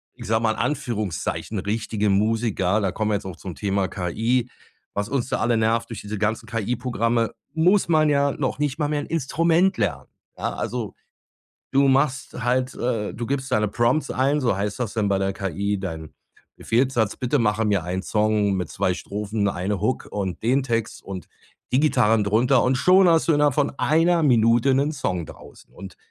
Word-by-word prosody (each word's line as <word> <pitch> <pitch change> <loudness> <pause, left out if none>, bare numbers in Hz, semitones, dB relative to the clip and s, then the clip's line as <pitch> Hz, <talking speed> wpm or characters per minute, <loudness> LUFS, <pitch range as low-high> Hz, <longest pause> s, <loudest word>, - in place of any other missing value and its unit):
ich - - -10
sage 110 +1 +1
mal, 110 - +3
in - - -4
Anführungszeichen, 110 - -2
richtige 105 0 -1
Musiker 105 -1 +1
da 95 - 0
kommen 110 +2 -1
wir - - +2
jetzt 100 - -4
auch 90 -4 -7
zum 90 -2 -8
Thema 100 -2 -1
KI 115 +7 -1 0.4
was 100 0 -2
uns 130 -2 -1
da - - -1
alle 120 0 +2
nervt, 115 +1 +1
durch 115 -4 -6
diese 105 +1 -5
ganzen 110 +2 -1
KI-Programme 115 +1 -1 0.2
muss 180 +4 +3
man 155 -2 +4
ja 140 -1 +2
noch 135 0 -3
nicht 145 -1 -1
mal 150 -1 0
mehr 150 -1 -1
'n - - -9
Instrument 165 +5 +1
lernen. - - -2 0.3
Ja, - - -2
also - - -4 0.8
du 140 0 +4
machst 135 0 +1
halt 125 +2 0
äh, 115 -4 -2
du 120 - -5
gibst 135 -1 -3
deine 105 -3 +2
Prompts 120 +8 +1
ein, 140 +3 +1
so 120 -7 +1
heißt 100 +2 -3
das 120 -4 -3
dann 110 -3 0
bei 100 - +1
der 95 0 -1
KI, 100 +2 -2
dein 80 -5 -6 0.4
Befehlssatz. 120 -3 0
„Bitte 130 +3 0
mache 110 -1 +1
mir 100 -5 +1
einen 90 +2 -3
Song 105 -1 +1
mit 90 -3 -3
2 90 - 0
Strophen, 105 +1 -3
1 100 +2 -3
Hook 120 +4 -1
und 95 -5 -4
den 130 +4 +2
Text 115 -4 -2
und 95 -2 -7 0.5
die 130 - +4
Gitarren 110 -8 +3
drunter." 120 +6 +3
und 130 +1 +2
schon 180 +5 +5
hast 165 0 +3
du 165 - +4
innerhalb 145 -2 +3
von 145 - +1
1 165 +2 +3
Minute 120 0 +4
'nen 140 +3 +1
Song 90 - -2
draußen - - -15
und 95 -2 -11
115 Hz, 190 wpm, -23 LUFS, 100-135 Hz, 0.8 s, schon